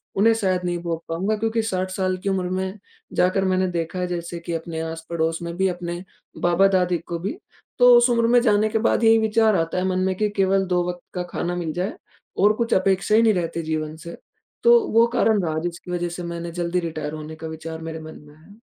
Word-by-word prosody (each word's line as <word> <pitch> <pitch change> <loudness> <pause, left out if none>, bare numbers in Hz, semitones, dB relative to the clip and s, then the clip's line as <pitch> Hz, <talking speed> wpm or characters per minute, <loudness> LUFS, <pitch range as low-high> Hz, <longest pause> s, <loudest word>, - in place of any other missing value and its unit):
उन्हें 225 +3 +5
शायद 190 -5 0
नहीं 175 0 -1
भोग 165 -1 -3
पाऊँगा। 190 +6 0
क्योंकि 225 +1 0
60 185 -3 -2
साल 185 -1 -1
की 200 - 0
उम्र 185 -2 -1
में 190 +2 -3 0.4
जाकर 190 +2 +2
मैंने 185 0 +2
देखा 170 +1 -3
है 180 - -1
जैसे 170 -1 -4
कि 170 0 -5
अपने 165 0 -4
आस-पड़ोस 165 0 -2
में 170 0 -5
भी, 190 0 +2
अपने 175 0 -4 0.4
बाबा-दादी 180 0 +3
को 170 0 -6
भी, 200 - -4 0.4
तो 245 0 +8
उस 240 +1 +4
उम्र 230 -1 +2
में 245 +1 +5
जाने 215 -2 +3
के 220 - 0
बाद 235 +1 +1
यही 225 0 +7
विचार 220 -1 +3
आता 165 +1 -1
है 185 - 0
मन 185 0 0
में 190 0 0
कि 210 -1 +1
केवल 195 0 +3
2 180 -1 +1
वक़्त 175 0 -6
का 180 - -1
खाना 175 +1 -2
मिल 165 -3 -3
जाए 185 +4 -2 0.4
और 205 +2 +5
कुछ 230 +1 -1
अपेक्षा 195 +2 +2
ही 225 - +6
नहीं 220 -2 +5
रहती 170 -2 -2
जीवन 155 -1 -3
से। 170 - -8 0.5
तो 475 0 +7
वो 230 +1 +6
कारण 215 -5 +3
रहा 160 -1 -1
जिसकी 175 +1 -5
वज़ह 175 -1 -1
से 175 +1 -6
मैंने 170 0 -5
ज़ल्दी 175 +1 -1
रिटायर 155 -3 -4
होने 155 0 -7
का 160 +1 -7
विचार 160 0 -7
मेरे 160 0 -6
मन 155 0 -10
में 150 - -16
है। 200 +8 -19
180 Hz, 225 wpm, -23 LUFS, 170-200 Hz, 0.5 s, तो